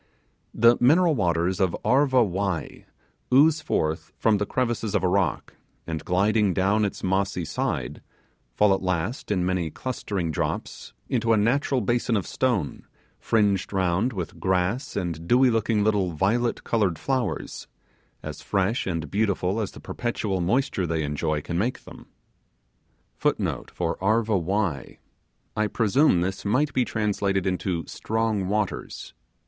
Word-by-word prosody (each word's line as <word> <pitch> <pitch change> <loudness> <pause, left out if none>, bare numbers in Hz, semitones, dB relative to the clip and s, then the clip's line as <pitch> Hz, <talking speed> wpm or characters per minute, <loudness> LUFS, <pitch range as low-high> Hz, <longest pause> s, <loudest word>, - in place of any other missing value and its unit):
The 115 +1 +5
mineral 160 +7 +5
waters 90 - 0
of 95 -3 +1
Arva 130 +1 +4
Wai* 95 -3 -3 0.4
ooze 155 +4 +5
forth 80 - -1
from 110 -2 +3
the 105 0 -2
crevices 120 -4 -1
of 100 - +1
a - - +3
rock, 95 -2 0 0.3
and 80 -1 -4
gliding 100 +1 +2
down 100 +3 +2
its 100 - -5
mossy 95 -1 0
side, - - -3 0.5
fall 105 -2 +4
at 95 - -1
last, 95 +6 -2
in 95 -4 +1
many 90 -3 0
clustering 100 - -3
drops, - - -4
into 115 -2 +1
a - - +4
natural 125 +4 +1
basin 120 +1 +1
of 95 - -2
stone 115 - -1 0.3
fringed 100 -4 +1
round 95 +4 +1
with 90 -7 -6
grass 95 +8 0
and 85 -3 -3
dewy 125 +3 +5
looking 110 -1 +1
little 100 -5 +1
violet 115 +9 0
coloured 100 -8 +1
flowers, 130 - -3 0.6
as - - -7
fresh 100 +3 0
and 80 -4 -3
beautiful 100 -1 0
as 105 - -2
the - - -11
perpetual 105 -6 -3
moisture 100 -1 0
they 80 -1 -1
enjoy 75 +1 -1
can 85 0 -2
make 120 +6 -2
them. - - -13 1.2
*I - - 0 2.0
presume 115 - +3
this 95 +2 -3
might 135 +8 +1
be 125 - +2
translated 100 -3 -1
into 90 -3 -1
'Strong 110 -3 -1
Waters'. 105 0 -3
100 Hz, 135 wpm, -25 LUFS, 90-115 Hz, 2.0 s, The